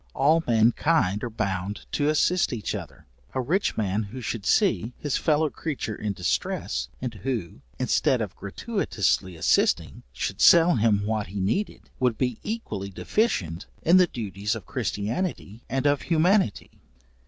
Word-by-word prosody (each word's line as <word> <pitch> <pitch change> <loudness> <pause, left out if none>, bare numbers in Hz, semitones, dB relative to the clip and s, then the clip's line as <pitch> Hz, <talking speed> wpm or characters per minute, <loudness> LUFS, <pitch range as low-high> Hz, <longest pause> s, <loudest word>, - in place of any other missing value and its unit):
All 155 +5 +3
mankind 115 - +2
are 120 - -2
bound 100 -2 -3
to 145 0 +1
assist 170 +3 +2
each 110 -4 -3
other; 80 -10 -8 0.3
a - - +1
rich 170 +11 0
man 100 -1 0
who 110 +5 -7
should 115 -4 -4
see, 110 +6 +2
his 145 -3 -2
fellow 155 -1 +2
creature 145 -8 -4
in 105 -2 -3
distress, 65 -8 -2
and 125 -3 -3
who, 105 -3 -4 0.2
instead 130 +1 +2
of 105 -5 -4
gratuitously 100 - -1
assisting, 80 - +1
should - - -4
sell 170 -3 +7
him 105 -2 +2
what 110 -1 -1
he 100 +3 -5
needed, 110 - -2
would 125 -4 +1
be 125 -3 -1
equally 110 - -4
deficient 95 - -1 0.2
in 175 +3 +6
the 180 -1 +6
duties 105 - -3
of 110 - -8
christianity 115 - -3
and 135 +1 -1
of 145 -1 +3
humanity. 175 - +1
115 Hz, 150 wpm, -26 LUFS, 100-150 Hz, 0.3 s, sell